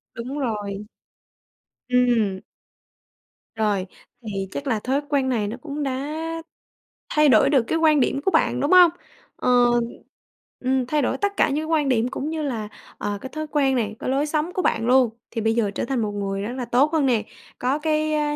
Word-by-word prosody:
Đúng 250 Hz, +5 st, -5 dB
rồi. 210 Hz, -4 st, -3 dB, 1.0 s
Ừm. 235 Hz, -6 st, +2 dB, 1.2 s
Rồi. 205 Hz, -4 st, 0 dB, 0.3 s
Thì 195 Hz, -4 st, -4 dB
chắc 285 Hz, -, -5 dB
là 225 Hz, -5 st, +1 dB
thói 265 Hz, +6 st, 0 dB
quen 275 Hz, -3 st, +1 dB
này 215 Hz, -5 st, 0 dB
nó 225 Hz, -, -5 dB
cũng 295 Hz, 0 st, -4 dB
đã 275 Hz, +2 st, -3 dB, 1.0 s
thay 300 Hz, -1 st, +4 dB
đổi 255 Hz, +3 st, +5 dB
được 270 Hz, -5 st, +4 dB
cái 325 Hz, -, -1 dB
quan 310 Hz, -2 st, +4 dB
điểm 275 Hz, +1 st, +1 dB
của 385 Hz, -, +3 dB
bạn, -, -, +2 dB
đúng 285 Hz, -, 0 dB
không? 360 Hz, -2 st, +8 dB, 0.4 s
Ờ. -, -, -1 dB, 1.1 s
Ừm, 260 Hz, 0 st, +1 dB
thay 295 Hz, +4 st, 0 dB
đổi 255 Hz, -, 0 dB
tất 405 Hz, 0 st, -1 dB
cả -, -, +4 dB
những 280 Hz, -, -1 dB
cái -, -, -4 dB
quan 310 Hz, -3 st, +1 dB
điểm 240 Hz, -2 st, +2 dB
cũng 280 Hz, +3 st, -4 dB
như 320 Hz, 0 st, -3 dB
là, 230 Hz, -7 st, -3 dB, 0.3 s
ờ, 205 Hz, 0 st, -3 dB
cái 265 Hz, -, -7 dB
thói 310 Hz, +2 st, -5 dB
quen 275 Hz, -3 st, +1 dB
này, 215 Hz, -4 st, -1 dB
cái -, -, -3 dB
lối 275 Hz, +3 st, +1 dB
sống 305 Hz, +3 st, -1 dB
của 370 Hz, -, -1 dB
bạn 225 Hz, -, 0 dB
luôn, 255 Hz, -1 st, +5 dB, 0.2 s
thì 225 Hz, -, -3 dB
bây 225 Hz, +1 st, +2 dB
giờ 220 Hz, -4 st, +1 dB
trở -, -, -3 dB
thành 255 Hz, -1 st, -1 dB
một 210 Hz, -1 st, -1 dB
người 195 Hz, -1 st, -3 dB
rất 215 Hz, +4 st, -4 dB
là 255 Hz, -2 st, -3 dB
tốt 255 Hz, +6 st, +3 dB
hơn 310 Hz, -3 st, +2 dB
nè, 235 Hz, -5 st, +2 dB, 0.4 s
có 265 Hz, +4 st, 0 dB
cái, 310 Hz, 0 st, 0 dB
a, 295 Hz, -1 st, 0 dB
260 Hz, 205 wpm, -23 LUFS, 225-295 Hz, 1.2 s, không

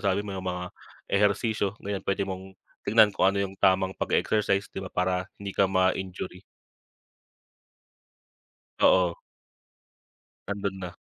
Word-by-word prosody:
nasabi 100 Hz, -1 st, +1 dB
mo 100 Hz, -, -5 dB
'yung 95 Hz, -1 st, -4 dB
mga 90 Hz, 0 st, -3 dB, 0.5 s
ehersisyo. 100 Hz, 0 st, +1 dB
Ngayon 100 Hz, -1 st, -2 dB
puwede 100 Hz, 0 st, +1 dB
mong 95 Hz, 0 st, -7 dB, 0.3 s
tignan, 105 Hz, -1 st, +6 dB
kung 95 Hz, -, +3 dB
ano 100 Hz, +1 st, 0 dB
'yung 95 Hz, -, -6 dB
tamang 95 Hz, 0 st, +3 dB
pag-e-exercise, 100 Hz, -2 st, +1 dB
'di -, -, -5 dB
ba, 95 Hz, -, -6 dB
para 90 Hz, 0 st, -1 dB
hindi 100 Hz, -1 st, -6 dB
ka 95 Hz, -, +3 dB
ma-injury. 95 Hz, -1 st, -1 dB, 2.4 s
Oo. 90 Hz, -2 st, +4 dB, 1.3 s
Nando'n 100 Hz, -1 st, -3 dB
na. 90 Hz, -1 st, -5 dB
95 Hz, 125 wpm, -27 LUFS, 95-100 Hz, 2.4 s, tignan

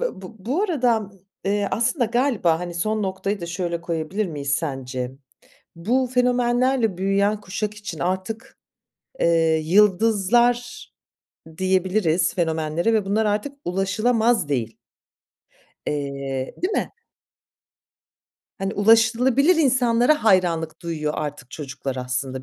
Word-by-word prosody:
b 195 Hz, -, -5 dB
bu 260 Hz, -, -1 dB
arada, 245 Hz, -, +1 dB, 0.3 s
eee, 200 Hz, 0 st, 0 dB
aslında 245 Hz, +4 st, +1 dB
galiba 230 Hz, -, +1 dB
hani 175 Hz, -1 st, -5 dB
son 215 Hz, +5 st, -1 dB
noktayı 195 Hz, +1 st, -2 dB
da 170 Hz, -, -5 dB
şöyle 170 Hz, -1 st, -3 dB
koyabilir 170 Hz, +4 st, -2 dB
miyiz 145 Hz, -4 st, -3 dB
sence? 130 Hz, -4 st, -3 dB, 0.6 s
Bu 245 Hz, +9 st, +1 dB
fenomenlerle 245 Hz, -3 st, +2 dB
büyüyen 200 Hz, +2 st, +1 dB
kuşak 205 Hz, +2 st, -4 dB
için 210 Hz, +1 st, -7 dB
artık, 190 Hz, +5 st, -4 dB, 0.6 s
eee, 165 Hz, -1 st, +3 dB
yıldızlar 220 Hz, +6 st, +2 dB, 0.7 s
diyebiliriz 185 Hz, -2 st, +1 dB
fenomenlere 160 Hz, +3 st, 0 dB
ve 215 Hz, -2 st, +2 dB
bunlar 205 Hz, +3 st, +1 dB
artık 210 Hz, +7 st, -1 dB
ulaşılamaz 215 Hz, +1 st, +1 dB
değil. 115 Hz, -5 st, -2 dB, 1.1 s
Eee, 140 Hz, -2 st, -3 dB
değil 375 Hz, -, 0 dB
mi? -, -, -1 dB, 1.7 s
Hani 195 Hz, 0 st, -3 dB
ulaşılabilir 230 Hz, -, +4 dB
insanlara 255 Hz, -1 st, +3 dB
hayranlık 175 Hz, -6 st, +2 dB
duyuyor 155 Hz, -3 st, -2 dB
artık 145 Hz, -4 st, -5 dB
çocuklar 140 Hz, -2 st, -6 dB
aslında 130 Hz, +1 st, -3 dB
195 Hz, 105 wpm, -23 LUFS, 160-230 Hz, 1.7 s, ulaşılabilir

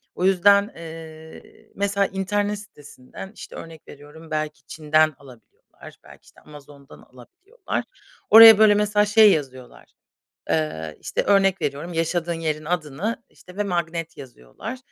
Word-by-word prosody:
O 180 Hz, -, -2 dB
yüzden, 200 Hz, +2 st, +3 dB
eee, 160 Hz, -1 st, -13 dB
mesela 200 Hz, 0 st, 0 dB
internet 205 Hz, +2 st, -2 dB
sitesinden, 150 Hz, -2 st, -13 dB
işte, -, -, -11 dB
örnek 165 Hz, -2 st, -12 dB
veriyorum 150 Hz, +3 st, -15 dB
belki 155 Hz, -2 st, -4 dB
Çin’den 155 Hz, 0 st, +1 dB
alabiliyorlar, 125 Hz, -6 st, -17 dB
belki, -, -, -17 dB
işte, -, -, -21 dB
Amazon’dan 145 Hz, -2 st, -16 dB
alabiliyorlar. 370 Hz, -, -8 dB, 0.5 s
Oraya, 225 Hz, 0 st, +10 dB
böyle, 215 Hz, -1 st, +6 dB
mesela 210 Hz, 0 st, +1 dB
şey 210 Hz, 0 st, +6 dB
yazıyorlar, 130 Hz, -6 st, -6 dB, 0.6 s
eee, 80 Hz, -, -3 dB
işte, -, -, -3 dB
örnek 195 Hz, -1 st, +2 dB
veriyorum, 145 Hz, +5 st, -4 dB
yaşadığın 170 Hz, +1 st, -2 dB
yerin 155 Hz, -2 st, -4 dB
adını, 170 Hz, +5 st, -4 dB
işte, 180 Hz, -, -18 dB
ve 205 Hz, -, -1 dB
magnet 170 Hz, -3 st, -4 dB
yazıyorlar. 130 Hz, -, -10 dB
165 Hz, 130 wpm, -22 LUFS, 150-200 Hz, 0.6 s, Oraya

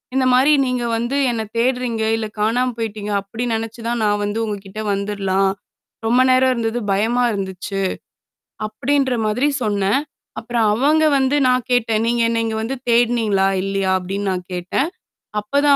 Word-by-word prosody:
இந்தமாரி 260 Hz, +2 st, +4 dB
நீங்க 250 Hz, -1 st, -1 dB
வந்து 240 Hz, +5 st, -1 dB
என்ன 225 Hz, -1 st, -2 dB, 0.2 s
தேட்றீங்க, 245 Hz, -2 st, 0 dB
இல்ல 225 Hz, -1 st, -2 dB
காணாம 245 Hz, +4 st, +1 dB
போயிட்டீங்க, 215 Hz, -2 st, -4 dB
அப்பிடி 220 Hz, +4 st, -6 dB
நெனச்சு 225 Hz, +1 st, -4 dB
தான் 235 Hz, -1 st, -1 dB
நான் 205 Hz, 0 st, +1 dB
வந்து 205 Hz, +2 st, -2 dB
உங்கக்கிட்ட 205 Hz, -1 st, -6 dB
வந்துர்லாம். 195 Hz, -1 st, 0 dB, 0.5 s
ரொம்ப 245 Hz, +3 st, +4 dB
நேரம் 255 Hz, 0 st, +4 dB
இருந்தது 230 Hz, 0 st, -1 dB
பயமா 230 Hz, +5 st, +1 dB
இருந்துச்சு. 195 Hz, 0 st, -4 dB, 0.8 s
அப்பிடின்ற 260 Hz, +4 st, 0 dB
மாதிரி 230 Hz, +7 st, +1 dB, 0.2 s
சொன்னேன். 205 Hz, +3 st, +1 dB, 0.4 s
அப்புறம் 235 Hz, -1 st, 0 dB
அவங்க 300 Hz, +7 st, +3 dB
வந்து 265 Hz, +2 st, +2 dB
நான் 250 Hz, -1 st, +2 dB
கேட்டேன். 225 Hz, -3 st, +2 dB
நீங்க 235 Hz, 0 st, +1 dB
என்ன 230 Hz, -1 st, -1 dB
வந்து 235 Hz, +5 st, -3 dB
தேடுனீங்களா 230 Hz, -5 st, +3 dB, 0.2 s
இல்லயா? 195 Hz, -1 st, 0 dB
அப்பிடின்னு 195 Hz, +2 st, -3 dB
நான் 180 Hz, -1 st, -3 dB
கேட்டேன். 180 Hz, -, -1 dB, 0.5 s
அப்பதான் 280 Hz, +7 st, +3 dB
225 Hz, 140 wpm, -20 LUFS, 205-250 Hz, 0.8 s, இந்தமாரி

